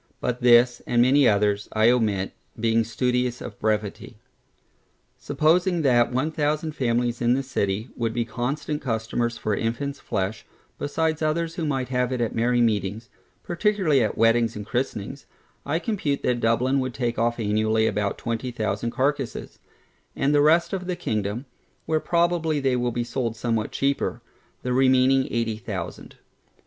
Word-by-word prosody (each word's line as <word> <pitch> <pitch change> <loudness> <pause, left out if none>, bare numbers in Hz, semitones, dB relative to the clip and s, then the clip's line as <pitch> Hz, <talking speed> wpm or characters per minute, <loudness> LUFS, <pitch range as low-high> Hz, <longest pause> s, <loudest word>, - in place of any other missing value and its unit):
But 125 0 -2
this, 120 0 +5
and 120 - +1
many 130 +2 +5
others, 105 0 +1
I 110 +2 +5
omit, 105 -6 0 0.3
being 115 0 +2
studious 125 +2 -1
of - - -9
brevity. 105 -2 -2 1.0
Supposing 175 +2 +2
that 120 -3 +3
one 130 +6 0
thousand 155 +1 -1
families 120 -3 -1
in 120 +1 +3
this 135 0 -3
city, 100 +4 -1
would 115 -2 -1
be 115 0 -1
constant 140 +6 -3
customers 120 -1 -2
for 105 - -1
infants 140 +7 -3
flesh, 105 0 -3 0.4
besides 160 +2 -1
others 160 +2 0
who 165 -3 -3
might 135 -3 -1
have 125 -1 0
it 130 - -2
at 115 -2 -1
merry 120 +1 +2
meetings, 110 +1 0 0.3
particularly 175 - +1
at 105 - -2
weddings 115 0 +3
and 105 -1 -6
christenings, 125 +1 -3 0.4
I 150 +3 +1
compute 170 -8 -2
that 125 -1 +1
Dublin 120 +4 +2
would 130 -2 -3
take 120 -3 -2
off 120 +1 0
annually 110 +1 +1
about 105 -2 -1
twenty 115 +2 -3
thousand 110 -1 -2
carcasses; 135 +1 -2 0.6
and 140 +2 +1
the 145 - +5
rest 160 +5 +3
of 180 -2 -3
the 180 - -1
kingdom 110 - -3 0.4
(where 160 -1 +1
probably 170 -2 +1
they 135 -2 +1
will 125 0 0
be 120 +1 -2
sold 120 -2 -3
somewhat 115 -1 -1
cheaper) 140 +1 -1 0.4
the 125 - -1
remaining 130 0 +4
eighty 115 -2 -1
thousand. 110 - -6
125 Hz, 160 wpm, -24 LUFS, 115-140 Hz, 1.0 s, this